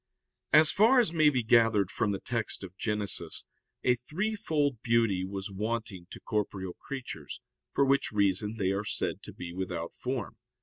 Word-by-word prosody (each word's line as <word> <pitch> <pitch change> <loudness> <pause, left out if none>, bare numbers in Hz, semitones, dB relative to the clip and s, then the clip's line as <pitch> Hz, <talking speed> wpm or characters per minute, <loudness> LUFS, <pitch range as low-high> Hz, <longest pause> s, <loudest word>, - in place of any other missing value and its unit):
As 155 0 +7
far 230 +6 +5
as 215 -9 +2
may 155 -2 +5
be 130 -5 0
gathered 115 -4 +4
from 105 - 0
the 100 - -2
text 115 -4 -3
of 95 -1 -9
Genesis 105 -1 -3 0.4
a 125 - +5
threefold 150 - -1
beauty 115 -6 +2
was 95 +1 -5
wanting 105 -3 -3
to - - -9
corporeal 100 -4 -2
creatures, 135 -2 -6 0.3
for 140 - +3
which 135 -1 +2
reason 100 +1 +1
they 95 -3 +1
are 100 +1 -1
said 100 - -2
to - - -9
be 85 -1 -8
without 90 -2 -4
form. 125 -5 -4
110 Hz, 165 wpm, -30 LUFS, 95-135 Hz, 0.4 s, As